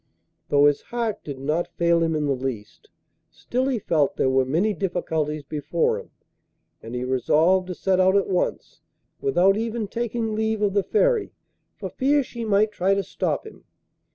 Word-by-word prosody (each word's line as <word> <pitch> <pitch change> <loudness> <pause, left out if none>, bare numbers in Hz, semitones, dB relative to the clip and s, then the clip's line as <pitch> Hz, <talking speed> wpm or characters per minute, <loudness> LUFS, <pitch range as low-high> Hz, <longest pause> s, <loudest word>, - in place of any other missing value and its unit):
Though 145 0 +5
his 145 -1 +3
heart 230 -3 -3
did 140 -3 -6
not 150 +6 -2
fail 170 0 +3
him 165 -1 +1
in 150 -1 0
the 140 - 0
least, 125 -5 -6 0.4
still 255 +2 -2
he 265 -3 0
felt 155 -8 +1
there 130 - +2
were 130 0 +3
many 175 +11 +1
difficulties 160 -5 -2
before 150 +3 -1
him, - - -12 0.7
and 115 +2 -8
he 125 - -2
resolved 155 +9 +2
to 180 - -5
set 190 +1 +1
out 185 +1 +4
at 200 - +3
once, 185 -2 -2 0.4
without 195 - +3
even 225 -1 -2
taking 230 0 -2
leave 220 0 -1
of 200 -2 +1
the 200 - +3
Fairy, 450 - +1 0.4
for - - -5
fear 285 +2 +2
she 235 -2 -7
might 215 0 +2
try 195 -1 +1
to 200 - -1
stop - - -2
him. 435 - -13
185 Hz, 180 wpm, -24 LUFS, 150-220 Hz, 0.7 s, Though